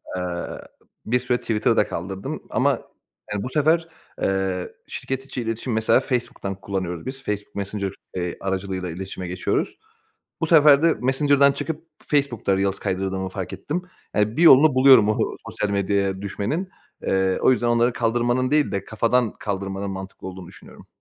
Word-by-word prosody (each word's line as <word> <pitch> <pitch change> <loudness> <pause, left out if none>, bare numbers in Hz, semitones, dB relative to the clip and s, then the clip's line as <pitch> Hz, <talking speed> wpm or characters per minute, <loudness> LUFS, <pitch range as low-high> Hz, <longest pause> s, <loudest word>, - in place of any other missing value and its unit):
Eee, 90 - -2 0.8
bir 125 +3 +2
süre 125 0 0
Twitter'ı 115 -3 +1
da - - +4
kaldırdım. 95 +3 -5
Ama, - - +2 0.6
yani, 105 -1 -2
bu - - -4
sefer, 160 +4 +2 0.4
ııı, 95 -1 -1 0.2
şirket 135 0 -4
içi 130 - -4
iletişim 115 +1 -2
-mesela 110 +2 +4
Facebook'tan 120 -7 -3
kullanıyoruz 95 -3 -4
biz 135 +1 -6
Facebook 105 -2 -4
Messenger, 100 -1 -3 0.3
iii, 90 -1 -3
aracılığıyla 95 -1 -3
iletişime 95 +1 -6
geçiyoruz. 90 +1 -1 0.6
Bu 165 - +1
sefer 150 -3 +7
de 165 -1 +4
Messenger'dan 140 +2 +3
çıkıp 160 +3 -5 0.2
Facebook'ta 125 -9 +1
reels 95 0 0
kaydırdığımı 95 0 -2
fark 95 -1 -6
ettim. 170 +5 -3 0.3
Yani, 105 +2 +1
bir 165 - +2
yolunu 150 -2 +8
buluyorum 130 -5 +7
o 110 - +2 0.3
sosyal 105 - -2
medyaya 100 -1 0
düşmenin. 110 - -2 0.3
Eee, 95 -1 +1
o - - +6
yüzden 120 -1 0
onları 120 +1 +3
kaldırmanın 120 +2 +1
değil 150 0 +2
de 100 -1 -2
kafadan 115 +2 +1
kaldırmanın 100 -1 -3
mantıklı 95 0 -7
olduğunu 95 -1 -9
düşünüyorum. - - -14
105 Hz, 155 wpm, -23 LUFS, 95-130 Hz, 0.8 s, yolunu